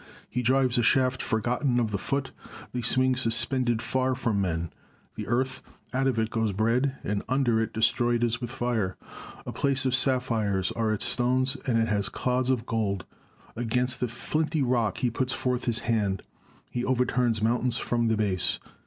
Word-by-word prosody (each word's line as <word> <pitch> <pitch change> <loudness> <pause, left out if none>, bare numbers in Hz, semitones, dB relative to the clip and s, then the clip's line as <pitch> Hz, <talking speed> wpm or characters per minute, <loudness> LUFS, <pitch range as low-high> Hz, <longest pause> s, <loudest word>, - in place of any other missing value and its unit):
He 125 - -2
drives 125 0 +2
a - - +3
shaft 130 +2 +2
forgotten 120 +2 0
of 115 -3 0
the 100 - -2
foot, 135 +3 -2 0.4
they 125 - -2
swing 130 +2 +3
suspended, 120 0 +2
far 130 0 0
from 115 -6 0
men! 85 -3 -2 0.4
The - - -6
earth, 130 +3 0 0.3
out 135 +1 +1
of 130 -4 0
it 110 0 0
goes 110 -3 0
bread; 120 +7 +1
and 100 0 -1
under 125 -4 +2
it 115 - 0
is - - -31
destroyed 120 +1 +1
as 115 0 0
with 120 - -4
fire. 120 -7 -2 0.5
A - - -5
place 135 -1 +3
of 130 - +1
sap 130 0 +4
phires, 100 -6 -1
are 110 -1 -1
its 110 - 0
stones; 130 +2 +1
and 120 -3 +2
it 115 0 +2
has 100 -2 +1
clods 125 0 -1
of 125 -3 0
gold. 100 -4 -2 0.3
— - - -29
Against 120 +2 0
the 125 - 0
flinty 150 +5 -1
rock 120 -4 0
he 125 -2 0
puts 130 +2 0
forth 125 -1 -1
his 120 -2 +3
hand; 105 -5 0 0.5
he 120 - -2
overturns 125 -3 +1
mountains 120 +1 +2
from 120 -1 0
the 110 -1 +1
base. 100 -4 0
120 Hz, 190 wpm, -27 LUFS, 110-130 Hz, 0.5 s, sap